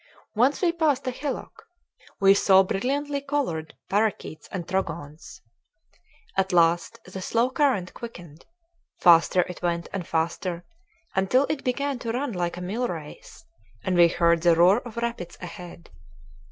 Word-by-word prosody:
Once 255 Hz, -, +2 dB
we 345 Hz, -, +4 dB
passed 310 Hz, -6 st, 0 dB
a 255 Hz, -, -1 dB
hillock. 275 Hz, +2 st, -6 dB, 0.5 s
We 195 Hz, 0 st, +6 dB
saw 195 Hz, -1 st, +5 dB
brilliantly 280 Hz, +9 st, -2 dB
colored 275 Hz, -, -3 dB
parakeets 205 Hz, -6 st, -1 dB
and 175 Hz, -4 st, -5 dB
trogons. 165 Hz, -5 st, -4 dB, 0.9 s
At 190 Hz, 0 st, +1 dB
last 170 Hz, -1 st, +2 dB
the 185 Hz, +1 st, -8 dB
slow 235 Hz, +6 st, +1 dB
current 255 Hz, -11 st, +1 dB
quickened. 175 Hz, -10 st, -11 dB, 0.5 s
Faster 175 Hz, +1 st, +5 dB
it 180 Hz, 0 st, -6 dB
went, 170 Hz, -1 st, -2 dB
and 190 Hz, -4 st, -4 dB
faster, 170 Hz, +2 st, -2 dB, 0.5 s
until 195 Hz, +9 st, +3 dB
it 305 Hz, -, -2 dB
began 275 Hz, +1 st, -1 dB
to 230 Hz, -2 st, -3 dB
run 265 Hz, +2 st, -2 dB
like 175 Hz, -1 st, -2 dB
a -, -, -6 dB
mill 220 Hz, +8 st, -2 dB
race, 160 Hz, -7 st, -9 dB, 0.4 s
and 185 Hz, -, 0 dB
we 175 Hz, -1 st, +7 dB
heard 170 Hz, 0 st, +2 dB
the 170 Hz, -1 st, +5 dB
roar 180 Hz, +6 st, +5 dB
of 240 Hz, -2 st, -11 dB
rapids 235 Hz, -7 st, -4 dB
ahead. 175 Hz, -1 st, -10 dB
190 Hz, 145 wpm, -25 LUFS, 170-250 Hz, 0.9 s, we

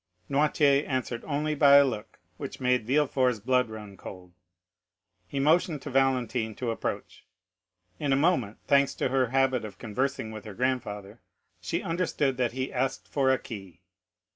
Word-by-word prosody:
Noirtier 145 Hz, 0 st, +3 dB
answered 130 Hz, -3 st, -2 dB
only 150 Hz, +1 st, -1 dB
by 140 Hz, -1 st, +6 dB
a 140 Hz, 0 st, +8 dB
look 110 Hz, -6 st, -5 dB, 0.2 s
which -, -, -7 dB
made 125 Hz, -3 st, +1 dB
Villefort's 130 Hz, -3 st, +2 dB
blood 125 Hz, +2 st, +1 dB
run 105 Hz, -2 st, -9 dB
cold. 90 Hz, -2 st, -11 dB, 0.9 s
He 135 Hz, -, -4 dB
motioned 155 Hz, 0 st, +2 dB
to 145 Hz, -, -6 dB
Valentine 125 Hz, -4 st, +1 dB
to 120 Hz, -2 st, -2 dB
approach. 115 Hz, -, -5 dB, 0.7 s
In 145 Hz, -2 st, -1 dB
a -, -, +5 dB
moment, 135 Hz, -, +1 dB
thanks 140 Hz, -1 st, +3 dB
to -, -, -1 dB
her 130 Hz, -1 st, +2 dB
habit 130 Hz, -1 st, +1 dB
of 100 Hz, -3 st, -8 dB
conversing 120 Hz, +1 st, -2 dB
with 110 Hz, -1 st, -9 dB
her 105 Hz, -2 st, -8 dB
grandfather, 110 Hz, -4 st, -3 dB, 0.4 s
she -, -, -3 dB
understood 165 Hz, -6 st, 0 dB
that 120 Hz, -2 st, 0 dB
he 130 Hz, +1 st, -3 dB
asked 130 Hz, +1 st, -2 dB
for 135 Hz, -2 st, +1 dB
a 130 Hz, -, +4 dB
key. 95 Hz, -7 st, -10 dB
130 Hz, 160 wpm, -28 LUFS, 110-140 Hz, 0.9 s, a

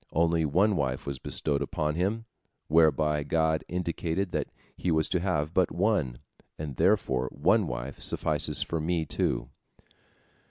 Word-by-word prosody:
Only 85 Hz, 0 st, +2 dB
one 95 Hz, +8 st, +3 dB
wife 65 Hz, -5 st, -1 dB
was 70 Hz, -2 st, -4 dB
bestowed 70 Hz, -1 st, -1 dB
upon 75 Hz, +2 st, -1 dB
him, 100 Hz, +7 st, -1 dB, 0.4 s
whereby 75 Hz, -1 st, +3 dB
God 80 Hz, +1 st, +1 dB
indicated 90 Hz, +1 st, -2 dB
that -, -, -1 dB, 0.3 s
he 90 Hz, -, -2 dB
was 80 Hz, -1 st, +2 dB
to 90 Hz, -, +1 dB
have 85 Hz, -4 st, -1 dB
but 90 Hz, -2 st, +3 dB
one, 85 Hz, -, 0 dB, 0.4 s
and 75 Hz, -3 st, -5 dB
therefore 65 Hz, 0 st, +2 dB
one -, -, +2 dB
wife 65 Hz, +2 st, -5 dB
suffices -, -, +1 dB
for 85 Hz, -, -3 dB
me, 80 Hz, 0 st, 0 dB
too." 65 Hz, -4 st, -1 dB
80 Hz, 145 wpm, -28 LUFS, 75-90 Hz, 0.4 s, one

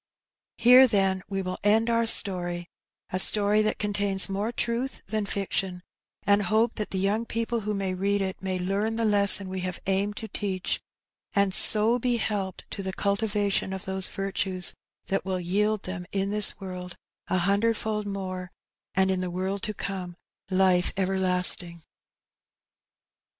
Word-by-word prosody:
Here, 250 Hz, +3 st, +7 dB
then, 195 Hz, -4 st, 0 dB
we 195 Hz, -1 st, -3 dB
will 185 Hz, 0 st, -5 dB
end 220 Hz, +3 st, +2 dB
our 230 Hz, 0 st, +1 dB
story 175 Hz, -5 st, +4 dB, 0.2 s
— -, -, -66 dB
a 185 Hz, -, -1 dB
story 210 Hz, +2 st, +3 dB
that 215 Hz, -, -1 dB
contains 205 Hz, -2 st, +1 dB
more 200 Hz, +3 st, -3 dB
truth 240 Hz, +3 st, -4 dB
than 215 Hz, -2 st, -3 dB
fiction 190 Hz, -2 st, -3 dB, 0.2 s
— -, -, -48 dB
and 200 Hz, +1 st, +3 dB
hope 220 Hz, +4 st, +1 dB
that 210 Hz, -, -2 dB
the 190 Hz, -, -4 dB
young 200 Hz, +4 st, 0 dB
people 230 Hz, 0 st, -3 dB
who 210 Hz, -1 st, -4 dB
may 195 Hz, -1 st, -3 dB
read 200 Hz, +2 st, -1 dB
it 190 Hz, -1 st, -4 dB
may 190 Hz, -1 st, -3 dB
learn 200 Hz, +5 st, -2 dB
the 230 Hz, 0 st, -1 dB
lesson 200 Hz, -2 st, +4 dB
we 185 Hz, 0 st, -5 dB
have 185 Hz, -1 st, -5 dB
aimed 200 Hz, +2 st, -1 dB
to 220 Hz, -, -5 dB
teach, 190 Hz, -4 st, -3 dB, 0.5 s
and 200 Hz, -1 st, +1 dB
so 225 Hz, +5 st, +6 dB
be 245 Hz, 0 st, -1 dB
helped 200 Hz, -4 st, -4 dB
to 200 Hz, -, -5 dB
the 190 Hz, -1 st, -5 dB
cultivation 200 Hz, -1 st, -1 dB
of 190 Hz, -, -7 dB
those 190 Hz, 0 st, +1 dB
virtues 190 Hz, -2 st, -2 dB, 0.3 s
that 195 Hz, -, -2 dB
will 190 Hz, -1 st, -3 dB
yield 205 Hz, +4 st, -1 dB
them 180 Hz, -1 st, -6 dB
in 195 Hz, 0 st, -2 dB
this 210 Hz, -1 st, +6 dB
world 180 Hz, -2 st, -8 dB, 0.3 s
*^a 185 Hz, -, 0 dB
hundredfold 210 Hz, +3 st, -1 dB
naore, 185 Hz, -2 st, -5 dB, 0.5 s
and 190 Hz, 0 st, +2 dB
in 185 Hz, -1 st, -2 dB
the 180 Hz, -, -3 dB
world 190 Hz, +3 st, -4 dB
to 215 Hz, -, -3 dB
come 185 Hz, -3 st, -6 dB, 0.3 s
Ufe 185 Hz, -1 st, +2 dB
everlasting. 180 Hz, -3 st, +4 dB
195 Hz, 165 wpm, -25 LUFS, 185-210 Hz, 0.5 s, Here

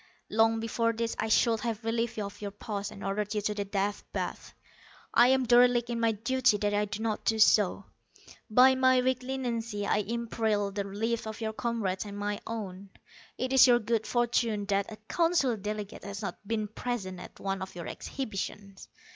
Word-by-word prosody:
Long 225 Hz, +1 st, +3 dB
before 230 Hz, +1 st, 0 dB
this 230 Hz, 0 st, -2 dB
I 220 Hz, -, -1 dB
should 225 Hz, +1 st, +3 dB
have 225 Hz, 0 st, -3 dB
relieved 230 Hz, 0 st, -1 dB
you 210 Hz, -, -2 dB
of 200 Hz, +1 st, -9 dB
your 205 Hz, -, -3 dB
post, 205 Hz, 0 st, -5 dB
and 200 Hz, -, -10 dB
ordered 205 Hz, +2 st, -2 dB
you 210 Hz, -, +1 dB
to 210 Hz, +1 st, -1 dB
the 205 Hz, -1 st, -3 dB
Death 200 Hz, +1 st, -2 dB
Bath. -, -, -5 dB, 0.6 s
I 240 Hz, -, +7 dB
am 260 Hz, 0 st, +3 dB
derelict 240 Hz, 0 st, +4 dB
in 235 Hz, -, -2 dB
my 230 Hz, -1 st, +2 dB
duty 240 Hz, +1 st, +2 dB
that 205 Hz, 0 st, 0 dB
I 205 Hz, 0 st, +2 dB
do 210 Hz, +2 st, -5 dB
not 220 Hz, -2 st, -1 dB
do 220 Hz, -, +1 dB
so. 205 Hz, -2 st, +4 dB, 0.6 s
By 255 Hz, +4 st, +7 dB
my 260 Hz, 0 st, +4 dB
weak 255 Hz, 0 st, +1 dB
leniency 235 Hz, -5 st, -3 dB
I 200 Hz, -, +2 dB
imperil 220 Hz, -1 st, -1 dB
the 200 Hz, 0 st, -3 dB
lives 220 Hz, +3 st, -2 dB
of 220 Hz, -, -6 dB
your 220 Hz, -1 st, -3 dB
comrades, 220 Hz, -5 st, -2 dB
and 205 Hz, -1 st, -7 dB
my 205 Hz, 0 st, -2 dB
own. 200 Hz, -4 st, -6 dB, 0.5 s
It 255 Hz, +1 st, -2 dB
is 265 Hz, 0 st, +8 dB
your 245 Hz, -1 st, +6 dB
good 225 Hz, -1 st, -1 dB
fortune 235 Hz, -3 st, +1 dB
that 200 Hz, +1 st, 0 dB
a -, -, -6 dB
Council 330 Hz, -8 st, +2 dB
delegate 210 Hz, 0 st, -5 dB
has 200 Hz, +2 st, -6 dB
not 200 Hz, -, -6 dB
been 215 Hz, -1 st, -1 dB
present 205 Hz, -4 st, -4 dB
at -, -, -11 dB
one 195 Hz, -1 st, -2 dB
of 190 Hz, -1 st, -7 dB
your 170 Hz, -2 st, -6 dB
exhibitions. 200 Hz, -5 st, -6 dB
220 Hz, 195 wpm, -29 LUFS, 205-235 Hz, 0.6 s, is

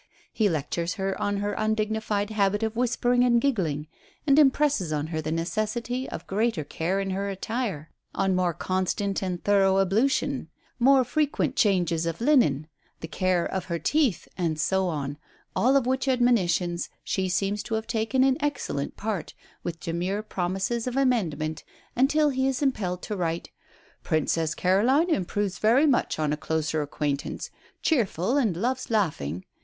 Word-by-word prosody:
He 215 Hz, -3 st, +2 dB
lectures 170 Hz, +2 st, -2 dB
her 195 Hz, -2 st, -2 dB
on 205 Hz, 0 st, 0 dB
her 205 Hz, +1 st, -1 dB
undignified 215 Hz, -1 st, -1 dB
habit 205 Hz, 0 st, +1 dB
of 220 Hz, 0 st, -1 dB
whispering 245 Hz, 0 st, +2 dB
and 240 Hz, -1 st, +4 dB
giggling, 180 Hz, -, 0 dB, 0.4 s
and 280 Hz, 0 st, +5 dB
impresses 275 Hz, -, +3 dB
on 150 Hz, -1 st, -1 dB
her 160 Hz, -, -1 dB
the 155 Hz, 0 st, -3 dB
necessity 215 Hz, +9 st, -2 dB
of -, -, -7 dB
greater 210 Hz, -4 st, 0 dB
care 175 Hz, +6 st, -2 dB
in 195 Hz, -1 st, -2 dB
her 200 Hz, +1 st, -2 dB
attire, 195 Hz, -, -3 dB, 0.2 s
on 195 Hz, -1 st, +1 dB
more 180 Hz, -2 st, +1 dB
constant 190 Hz, +2 st, -1 dB
and 180 Hz, -2 st, -3 dB
thorough 195 Hz, -1 st, +4 dB
ablution, 215 Hz, +8 st, +1 dB, 0.3 s
more 265 Hz, +2 st, +5 dB
frequent 275 Hz, +1 st, 0 dB
changes 175 Hz, -, +2 dB
of 165 Hz, -1 st, -3 dB
linen, 235 Hz, -, +3 dB, 0.4 s
the 160 Hz, -, -5 dB
care 185 Hz, 0 st, +1 dB
of 190 Hz, -2 st, -3 dB
her 170 Hz, -2 st, -2 dB
teeth, 275 Hz, -, +1 dB
and 165 Hz, -4 st, -1 dB
so 190 Hz, +3 st, +1 dB
on 145 Hz, -3 st, -3 dB, 0.4 s
all 265 Hz, +3 st, +4 dB
of 265 Hz, -, +1 dB
which 260 Hz, +1 st, 0 dB
admonitions 185 Hz, -9 st, +2 dB
she 190 Hz, -1 st, -1 dB
seems 200 Hz, +3 st, 0 dB
to 225 Hz, -, -3 dB
have 220 Hz, 0 st, -2 dB
taken 225 Hz, +3 st, +1 dB
in 270 Hz, +2 st, +2 dB
excellent 250 Hz, -, -2 dB
part, 210 Hz, -6 st, -4 dB, 0.3 s
with 165 Hz, -1 st, -5 dB
demure 180 Hz, +5 st, -2 dB
promises 195 Hz, +5 st, -2 dB
of 250 Hz, +1 st, -2 dB
amendment, 160 Hz, -, 0 dB, 0.3 s
until 295 Hz, +4 st, +3 dB
he 265 Hz, 0 st, +1 dB
is 270 Hz, +1 st, -1 dB
impelled 190 Hz, -10 st, -1 dB
to 210 Hz, -, -3 dB
write, 170 Hz, -2 st, -2 dB, 0.5 s
"Princess 160 Hz, 0 st, 0 dB
Caroline 250 Hz, -, +3 dB
improves 200 Hz, -, -1 dB
very 240 Hz, +7 st, +4 dB
much 275 Hz, -5 st, +2 dB
on 150 Hz, -1 st, 0 dB
a -, -, -2 dB
closer 160 Hz, 0 st, -1 dB
acquaintance 145 Hz, -1 st, -3 dB, 0.3 s
cheerful 230 Hz, -, +1 dB
and 225 Hz, -12 st, +1 dB
loves 255 Hz, +6 st, -1 dB
laughing. 145 Hz, -, -1 dB
200 Hz, 160 wpm, -26 LUFS, 170-245 Hz, 0.5 s, and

